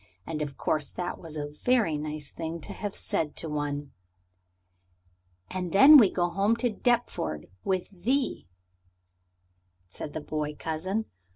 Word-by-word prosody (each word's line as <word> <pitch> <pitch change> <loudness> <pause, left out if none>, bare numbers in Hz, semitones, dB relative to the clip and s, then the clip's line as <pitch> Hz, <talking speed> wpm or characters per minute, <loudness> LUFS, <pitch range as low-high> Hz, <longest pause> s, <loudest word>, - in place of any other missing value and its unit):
And 155 -2 -4
of 145 -2 -4
course 155 -3 0
that 180 0 -4
was 160 -2 -7
a 145 - -2 0.2
very 235 -11 +3
nice 150 -1 -5
thing 165 0 -4
to - - -6
have 205 -2 -5
said 150 -2 -1
to 165 - -3
one. 145 -2 -3 1.6
"And 180 -2 -3
then 275 +10 +10
we 220 -8 +7
go 175 -1 +1
home 200 +5 +2
to 235 0 0
Deptford 230 - 0 0.2
with 185 -1 -2
thee," 260 - 0 1.4
said 90 - -7
the 155 - -4
boy 150 0 -3
cousin. 185 +9 -2
165 Hz, 145 wpm, -28 LUFS, 150-205 Hz, 1.6 s, then